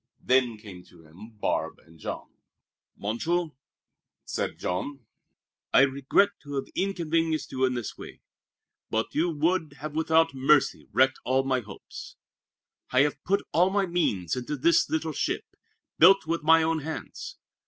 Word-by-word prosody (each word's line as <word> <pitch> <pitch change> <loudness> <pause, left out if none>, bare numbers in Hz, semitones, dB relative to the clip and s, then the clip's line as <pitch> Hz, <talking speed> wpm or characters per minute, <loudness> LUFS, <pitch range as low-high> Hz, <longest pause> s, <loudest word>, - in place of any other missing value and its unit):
Then 125 -3 +2
came 100 -4 -11
to 80 - -19
him 85 +8 -13
Barbe - - -1
and 80 0 -19
Jean. - - -6 0.7
"Monsieur," 160 +11 -1 0.7
said - - -3
Jean, 125 +8 -4 0.7
"I - - +8
regret 140 +8 +3
to 145 -1 -7
have 135 - -2
inconvenienced 165 -4 -1
you 130 0 +1
in 130 -1 0
this 120 -3 -5
way. - - -10 0.7
But 110 0 -1
you 165 +3 +1
would 160 -1 0 0.2
without 160 0 +2
mercy 135 +2 +2
have - - -29
wrecked 130 0 +4
all 130 +1 +2
my 130 -1 +1
hopes. 105 -5 -10 0.7
I 130 - +4
have 145 -1 0
put 200 +2 +1
all 175 +4 +4
my 200 0 +1
means 105 - 0
into 130 +4 -4
this 165 +5 +3
little 160 0 -1
ship, - - -2 0.5
built 195 +2 +7
with 165 +1 -1
my 160 +1 +5
own 160 0 +1
hands. 155 +2 -7
145 Hz, 150 wpm, -27 LUFS, 130-165 Hz, 0.7 s, I